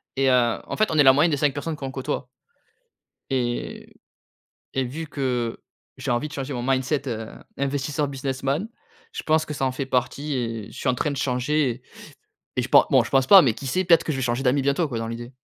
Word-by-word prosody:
et 135 0 +2
heu, 120 -3 +3
en - - -5
fait, 215 - +2
on 155 - 0
est 145 - +7
la 135 - +9
moyenne 150 +5 +3
des 145 - +1
5 145 -1 +2
personnes 155 +4 -4
qu'on 135 -3 -6
côtoie 135 0 -4 1.0
et 120 -3 -3 0.8
et 135 -1 +1
vu 155 +6 -5
que 125 -5 -2 0.4
j'ai - - -4
envie 120 +5 0
de - - -14
changer 140 0 -4
mon 120 -2 -3
mindset, 135 +2 0
heu, 110 -2 -4 0.3
investisseur 140 +2 -1
businessman, 135 +6 -2 0.4
je - - -5
pense 155 0 +2
que 150 - -5
ça 135 - -1
en 130 - 0
fait 130 +1 -4
partie 135 +3 -1
et 115 -4 -3
je 115 - -11
suis - - -2
en 130 - +3
train 150 - -1
de 140 - -4
changer 130 -1 0 0.7
et - - +1
je - - -4
pense - - +7
bon, - - +5
je - - -8
pense 135 -1 +3
pas 195 +3 +9
mais 120 -6 +2
qui 135 - -8
sait, 185 +9 0
peut-être 170 -1 +5
que 155 - -1
je - - -3
vais 130 - -2
changer 120 +1 0
d'amis 135 +2 +3
bientôt 140 +4 +1
quoi, 120 -4 -3
dans 115 - -3
l'idée. 120 +2 -7
135 Hz, 235 wpm, -24 LUFS, 125-145 Hz, 1.0 s, la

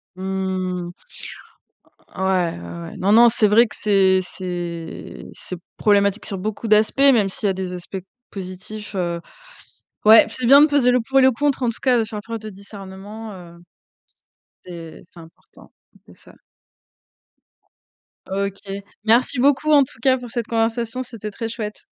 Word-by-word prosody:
Mmh, 185 -1 -3 1.3
ouais, 190 - -2 0.4
ouais, 85 0 -8
ouais. 85 - -9
Non, 195 +2 +1
non, 235 +2 +7
c'est 220 -2 +2
vrai 225 +4 +5
que - - -12
c'est 195 -2 +3
c'est 175 -3 -6
c'est 180 - -8 0.2
problématique 200 -1 +2
sur 195 - -4
beaucoup 215 +4 -4
d'aspects, 215 +4 +3
même 245 -8 +5
s'il 205 +2 -3
y - - +3
a - - +1
des 185 -1 -5
aspects 180 +2 -7 0.3
positifs, 195 +2 -8
heu, 170 -2 -2 0.8
ouais, 220 +1 +8
c'est 250 - -3
bien 280 +3 +8
de 300 - +7
peser 285 -4 +3
le 250 0 +3
pour 270 +4 +1
et - - +6
le 260 - +6
contre, 280 +1 -1
en 240 - +1
tout 230 - -10
cas, 250 -3 +3
de 225 - +1
faire 215 -1 -6
preuve 230 0 -6
de 215 0 -8
discernement, 200 +2 -10
heu 170 -2 -13 1.0
c'est 170 -3 -10
c'est 170 - -15
important. 165 +1 -18 0.3
C'est - - -17
ça. - - -19 1.9
OK, 195 0 -3 0.5
merci 245 +4 +3
beaucoup, 285 +3 +3
en 285 -2 +7
tout 240 - -9
cas, 260 0 +3
pour 245 -1 -9
cette 235 -1 -4
conversation, 230 +1 -1
c'était 225 -4 -8
très 225 +2 -5
chouette. 220 -2 -6
210 Hz, 165 wpm, -21 LUFS, 190-235 Hz, 1.9 s, ouais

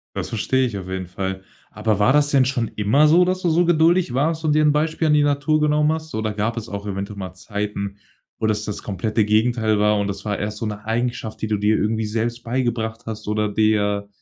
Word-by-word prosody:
Das - - -3
verstehe 130 +4 +1
ich 105 -4 -5
auf 95 -1 -7
jeden 95 -1 -4
Fall. 95 +1 -4 0.3
Aber 105 0 0
war 105 +6 +3
das 145 0 +4
denn 135 -3 +4
schon 125 -3 -1
immer 110 +9 +3
so, 170 +4 +5
dass 185 +1 -1
du 175 - +1
so 170 +2 +3
geduldig 170 -2 +3
warst 160 +5 0
und 150 - +3
dir 155 - +3
'n 150 - +5
Beispiel 155 +2 0
an 150 - +4
die 150 - +4
Natur 145 +1 +1
genommen 150 0 +2
hast? 160 0 -5
Oder 110 -1 -2
gab 110 +3 -1
es 115 - -5
auch 100 0 -6
eventuell 100 0 -5
mal 95 -2 -6
Zeiten, 100 0 -4 0.4
wo 110 - -2
das 105 -1 0
das 105 -1 -5
komplette 105 +2 -1
Gegenteil 110 0 +2
war 105 0 +3
und 100 -1 0
das 100 - -5
war 105 -2 -2
erst 105 +1 -3
so 115 - -2
'ne 105 0 -6
Eigenschaft, 115 0 -2
die 110 - -1
du 105 -1 0
dir 105 +2 +2
irgendwie 110 +1 0
selbst 115 +2 -2
beigebracht 115 -2 -2
hast 110 -1 -6
oder 105 0 0
dir 105 -1 +1
110 Hz, 235 wpm, -21 LUFS, 105-145 Hz, 0.4 s, so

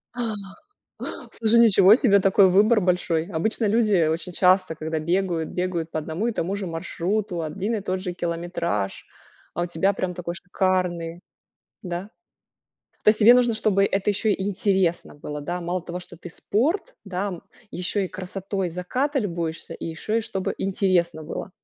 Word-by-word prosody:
А. 235 -3 -2 1.0
Слушай. 230 +1 +3
Ничего 210 -2 +7
себе 200 -6 +4
такой 195 0 +5
выбор 210 +4 +5
большой. 175 -3 +1
Обычно 215 +7 0
люди 205 -6 +3
очень 165 +3 -2
часто, 185 -1 +3
когда 160 +1 -3
бегают, 170 0 -1
бегают 175 -3 -2
по - - -3
одному 160 +8 -3
и 235 - 0
тому 195 0 -2
же 200 - -4
маршруту, 175 +2 -2
один 195 +8 -2
и - - -3
тот 185 -1 -2
же 185 -1 -4
километраж, 170 - -3 0.5
а 175 - -1
у - - 0
тебя 175 +3 +1
прям 180 -2 -2
такой 170 -1 -5
шикарный. 180 -2 -1 0.6
Да? 180 +2 -5 1.0
То - - +5
есть, 215 - 0
тебе 230 +3 +9
нужно, 245 -2 +3
чтобы 210 -3 +2
это 200 +1 0
ещё 210 +2 0
интересно 190 -3 0
было, 150 0 -6
да? 175 +4 -3
Мало 175 +1 -2
того, 180 +1 -6
что 180 -1 -11
ты 175 +1 -10
спорт, 320 - -1
да, 195 0 -2
м, 180 -4 -7 0.3
еще 185 +3 -1
и - - -11
красотой 190 0 -4
заката 255 - -1
любуешься, 170 -6 -3
и - - -8
ещё 165 +6 -4
и - - +2
чтобы 190 -3 -3
интересно 185 -4 +1
было. 155 +4 -6
185 Hz, 165 wpm, -24 LUFS, 170-205 Hz, 1.0 s, тебе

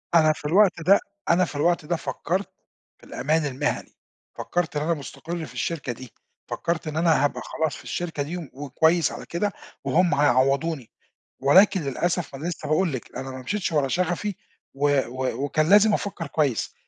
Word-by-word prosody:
أنا 155 -1 +6
في 150 - -13
الوقت 185 +1 +4
ده 195 +5 +5 0.3
أنا 175 +1 +4
في 150 - -9
الوقت 170 +2 +1
ده 175 - 0
فكّرت، 165 +6 -2 0.5
في - - -28
الأمان 155 +1 0
المهني، 145 +2 -2 0.4
فكرّت 175 -3 -2
إن - - 0
أنا 170 +1 +1
مُستقر 160 +3 -6
في - - -12
الشركة 155 -7 -2
دي، 125 +1 -10 0.3
فكرّت 170 -1 -2
إن 155 0 -3
أنا 160 -4 +3
هابقى - - -2
خلاص 160 -4 -2
في - - -12
الشركة 165 -5 -3
دي 170 +5 -5 0.2
وكويّس 160 +4 +2
على - - -8
كده، 200 +4 -1 0.3
وهُم 180 0 +3
هيعوضوني، 140 0 +2 0.5
ولكن 185 +7 +5
للأسف 155 +2 -2
أنا 155 +5 -5
لسّه 170 - -5
باقول 160 0 +2
لِك، 130 - -6
أنا 135 0 -5
ما 130 - -7
مشيتش 190 +6 -2
ورا 145 -3 +2
شغفي، 180 +5 -1 0.4
و 145 0 +2
و 130 +2 -3
وكان 155 +3 +1
لازم 210 +1 +6
أفكّر 190 -5 -3
كويّس، 140 -7 0
160 Hz, 175 wpm, -25 LUFS, 140-175 Hz, 0.5 s, أنا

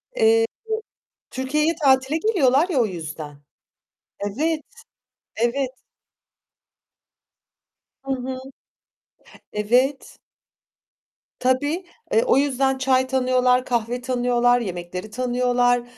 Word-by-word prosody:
Eee, 455 -1 +4 0.9
Türkiye'ye 300 +5 0
tatile 265 +2 +3
geliyorlar 325 - +3
ya 305 -8 +1
o 235 - +4
yüzden. 155 -5 -7 0.9
Evet, 305 +9 -1 0.7
evet. 250 +3 0 2.3
Hı 270 - -4
hı. 255 0 -5 1.1
Evet. 250 +6 +1 1.2
Tabii, 290 +8 0 0.3
eee, 455 - +4
o - - +3
yüzden 270 -1 +1
çay 260 0 +2
tanıyorlar, 255 -1 +2
kahve 240 0 -1
tanıyorlar, 245 -1 +2
yemekleri 180 0 -5
tanıyorlar. 245 0 +1
255 Hz, 85 wpm, -23 LUFS, 245-275 Hz, 2.3 s, Eee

